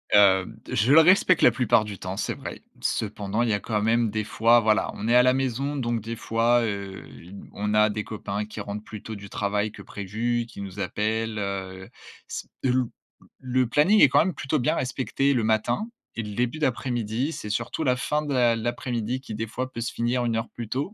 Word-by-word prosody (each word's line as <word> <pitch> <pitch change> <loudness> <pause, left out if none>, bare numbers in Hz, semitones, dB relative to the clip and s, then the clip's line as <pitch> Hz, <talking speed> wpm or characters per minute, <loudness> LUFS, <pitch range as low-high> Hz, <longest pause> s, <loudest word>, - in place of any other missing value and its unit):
Heu, 95 -2 +5 0.2
je 115 +7 +3
le 160 - +9
respecte 185 0 +5
la - - +7
plupart 115 -4 +3
du 105 -2 -7
temps, 95 +1 -5
c'est - - -1
vrai. - - -8 0.2
Cependant, 105 +1 -2
il 120 - 0
y - - +2
a 100 - 0
quand 105 -1 -2
même 115 +1 +2
des 110 +1 -2
fois, 115 +3 +4
voilà, 110 0 +2
on 110 - -4
est 120 - +4
à 125 - +7
la 125 0 +4
maison, 135 +2 -1
donc 120 -4 -1
des 115 +2 -5
fois, 115 +2 +2
heu, 100 -3 -4 0.2
y 90 +4 -13 0.2
on 105 +1 -2
a 105 0 +5
des 105 0 -3
copains 105 -1 -4
qui 110 0 -7
rentrent 105 +1 -6
plus 110 -2 -9
tôt 110 - -6
du 100 -1 -10
travail 105 +1 -1
que - - -11
prévu, 115 +4 -2
qui 100 - -10
nous 100 0 -7
appellent, 110 +3 -1
heu. 95 -1 -5 0.4
S - - -5 0.2
une 125 -2 +1 0.5
le 130 0 +1
planning 180 - +4
est 135 - +8
quand 145 - +4
même 175 +2 +1
plutôt 145 +1 -1
bien 120 - +1
respecté 135 +2 0
le 120 -3 +1
matin 115 - 0 0.3
et 115 - -2
le 105 -1 -7
début 125 +5 -1
d'après-midi. 125 0 -1
C'est 105 - -6
surtout 115 +8 -2
la 125 -3 +3
fin 150 +4 0
de 145 -2 -4
l'a 120 -2 +3
l'après-midi 120 +1 -2
qui, 110 - -8
des 115 +1 -3
fois, 130 +4 -4
peut 115 - -5
se 120 - -2
finir 120 +1 0
1 115 -1 0
heure 110 - -3
plus 115 -3 -8
tôt. 145 +11 -2
115 Hz, 225 wpm, -25 LUFS, 105-125 Hz, 0.5 s, le